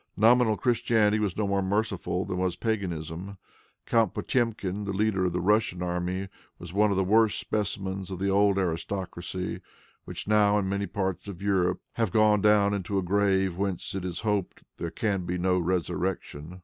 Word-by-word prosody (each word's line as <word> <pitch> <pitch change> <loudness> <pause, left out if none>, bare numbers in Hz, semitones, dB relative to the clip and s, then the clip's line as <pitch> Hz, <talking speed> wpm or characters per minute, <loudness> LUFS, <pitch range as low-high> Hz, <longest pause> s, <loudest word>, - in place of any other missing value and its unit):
Nominal 115 0 +4
Christianity 115 -3 +2
was 105 -4 -1
no 105 - +1
more 100 0 +1
merciful 95 -2 -1
than 90 - -3
was 90 -1 0
paganism. 95 -3 -3 0.5
Count 115 -4 +2
Potemkin, 105 -5 -1
the 100 - -2
leader 100 -2 +1
of 90 - 0
the 90 - 0
Russian 100 -1 +1
army, 90 +2 -2 0.3
was 85 0 -10
one 105 +2 +3
of 100 - 0
the 95 - +3
worst 110 +3 +3
specimens 100 -2 -3
of 95 - -5
the 95 +2 -1
old 100 0 +3
aristocracy, 90 0 -3 0.4
which - - -6
now, 105 -1 +4
in 100 -2 0
many 100 +1 -1
parts 95 -1 -3
of 95 -4 -7
Europe, 95 -3 +1
have 115 -5 0
gone 105 -1 +4
down 105 -1 +4
into 100 0 -2
a 95 - +1
grave 95 -1 +2
whence, 95 -2 -2
it 95 -2 -3
is 90 -2 -4
to - - -6
be 110 - 0
hoped, 100 -3 -3
there 85 - -3
can 100 0 -1
be 90 +1 -1
no 90 +1 +2
resurrection. 90 -1 -3
95 Hz, 185 wpm, -27 LUFS, 90-105 Hz, 0.5 s, Nominal